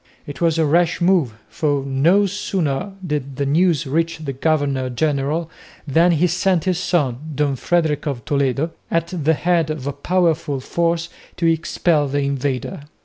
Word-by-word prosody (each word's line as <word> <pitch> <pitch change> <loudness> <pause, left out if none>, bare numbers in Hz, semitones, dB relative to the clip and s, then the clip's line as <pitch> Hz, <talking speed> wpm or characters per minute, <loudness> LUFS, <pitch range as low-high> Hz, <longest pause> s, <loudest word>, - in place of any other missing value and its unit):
It 145 0 -9
was 165 -1 +2
a 160 - +3
rash 170 +3 +2
move, 175 - +2
for 145 -3 -1
no 160 +10 +3
sooner 190 -3 -2
did 145 -4 -3
the 140 +1 -1
news 165 +2 +2
reach 165 +5 0
the 150 -4 -5
governor 140 -2 0
general 150 +5 -1 0.3
than 165 +4 +3
he 165 +2 +2
sent 180 0 +1
his 185 -2 0
son, 145 -10 0 0.2
Don 145 -1 +1
Frederick 155 +1 0
of 135 -5 -4
Toledo, 140 +2 0 0.2
at 165 0 0
the 160 -3 +1
head 170 -1 +1
of 155 -4 -4
a 140 - -2
powerful 160 -3 0
force 170 +4 -1 0.3
to 170 - -1
expel 165 -2 +1
the 145 +1 -1
invader. 140 0 -2
155 Hz, 160 wpm, -20 LUFS, 140-170 Hz, 0.3 s, a